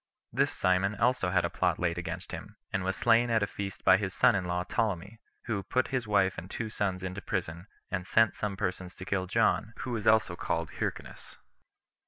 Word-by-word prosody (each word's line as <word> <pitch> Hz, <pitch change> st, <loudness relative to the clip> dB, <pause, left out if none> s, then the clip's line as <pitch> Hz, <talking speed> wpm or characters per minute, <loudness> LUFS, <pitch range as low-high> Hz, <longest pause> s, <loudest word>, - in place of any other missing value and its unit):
This -, -, +2 dB
Simon 95 Hz, +3 st, +1 dB
also 125 Hz, -4 st, +2 dB
had 90 Hz, -1 st, +2 dB
a -, -, -1 dB
plot -, -, +1 dB
laid 85 Hz, 0 st, 0 dB
against 90 Hz, -, -4 dB
him, -, -, -8 dB, 0.2 s
and 95 Hz, -, 0 dB
was 95 Hz, 0 st, -1 dB
slain 120 Hz, +1 st, +4 dB
at 110 Hz, -2 st, +3 dB
a -, -, +3 dB
feast 100 Hz, -1 st, -6 dB
by 95 Hz, -, +7 dB
his 95 Hz, -2 st, -3 dB
son -, -, +5 dB
in 95 Hz, -2 st, -1 dB
law 90 Hz, 0 st, -1 dB
Ptolemy, 100 Hz, +1 st, -2 dB, 0.3 s
who 110 Hz, -5 st, -1 dB
put 125 Hz, +7 st, 0 dB
his 125 Hz, -4 st, -1 dB
wife 100 Hz, -3 st, +2 dB
and 90 Hz, -, -10 dB
two 110 Hz, 0 st, -4 dB
sons 95 Hz, -3 st, -2 dB
into 95 Hz, +1 st, -4 dB
prison, 90 Hz, -2 st, -3 dB, 0.2 s
and 90 Hz, -1 st, -2 dB
sent 110 Hz, 0 st, +4 dB
some 100 Hz, -2 st, -3 dB
persons 95 Hz, -2 st, -3 dB
to 95 Hz, -, -8 dB
kill 95 Hz, -1 st, -1 dB
John, 110 Hz, +1 st, +2 dB
who 125 Hz, -, -4 dB
was 115 Hz, -2 st, -2 dB
also 110 Hz, -5 st, +4 dB
called -, -, -2 dB
Hyrcanus. -, -, -5 dB
95 Hz, 210 wpm, -30 LUFS, 90-110 Hz, 0.3 s, by